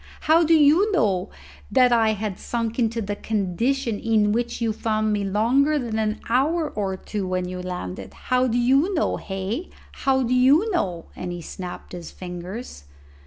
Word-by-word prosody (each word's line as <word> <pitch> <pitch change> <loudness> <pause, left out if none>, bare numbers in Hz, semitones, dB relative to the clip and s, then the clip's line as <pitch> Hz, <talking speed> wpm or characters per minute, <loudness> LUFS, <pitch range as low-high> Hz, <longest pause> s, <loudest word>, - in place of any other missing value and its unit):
How 320 +2 +4
do 325 0 +4
you 320 +8 +5
know 205 - +1 0.4
that 255 -2 +5
I 225 -2 +4
had 210 -2 -4
sunk 230 0 -3
into 230 -1 0
the 205 +1 -3
condition 220 +4 -1
in 215 -2 +2
which 235 +2 -1
you 225 -2 0
found 215 -1 0
me 205 -1 0
longer 240 +10 +2
than 230 -5 -2
an 215 0 -1
hour 300 +7 +1
or 195 -2 -2
two 200 0 -4
when 185 0 -1
you 180 0 -5
landed? 180 - -6
How 255 0 +1
do 240 0 0
you 275 +10 +3
know, 320 - 0
hey? 195 - -4 0.2
How 265 -1 +1
do 245 +1 0
you 280 - +4
know?" 180 - -1
and 180 - -5
he 175 - -5
snapped 180 +1 -8
his 175 -2 -7
fingers. 180 - -8
225 Hz, 175 wpm, -23 LUFS, 195-265 Hz, 0.4 s, you